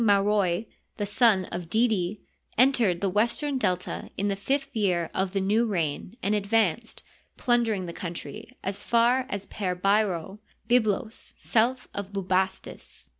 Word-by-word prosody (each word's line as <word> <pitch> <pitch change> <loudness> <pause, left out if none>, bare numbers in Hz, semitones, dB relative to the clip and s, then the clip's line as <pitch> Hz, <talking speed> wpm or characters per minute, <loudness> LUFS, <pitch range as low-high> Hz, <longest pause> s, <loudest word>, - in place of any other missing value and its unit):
Marol, 200 -2 +3 0.3
the 205 - -1
son 205 -2 +3
oiDidi, 190 +2 0 0.4
entered 235 -8 +4
the 200 - +1
western 240 +7 +1
Delta 180 -5 -1
in 200 +1 0
the 200 - 0
fifth 270 +8 -2
year 180 -6 +1
of 190 -1 0
the 195 - +1
new 210 +5 +2
reign 175 +2 -2
and 205 - +1
advanced, 215 +1 0 0.3
plundering 230 -6 +1
the 170 - -6
coun 170 -1 -5
try, 215 +5 -7 0.2
as 195 +1 -3
far 240 +2 +3
as 200 -1 -4
Per 185 -3 -3
Bairo 195 -1 0 0.3
(Byblos, 225 -1 0
south 250 +3 +1
of 200 -1 -5
Bubastis). 190 0 -2
205 Hz, 140 wpm, -27 LUFS, 190-230 Hz, 0.4 s, entered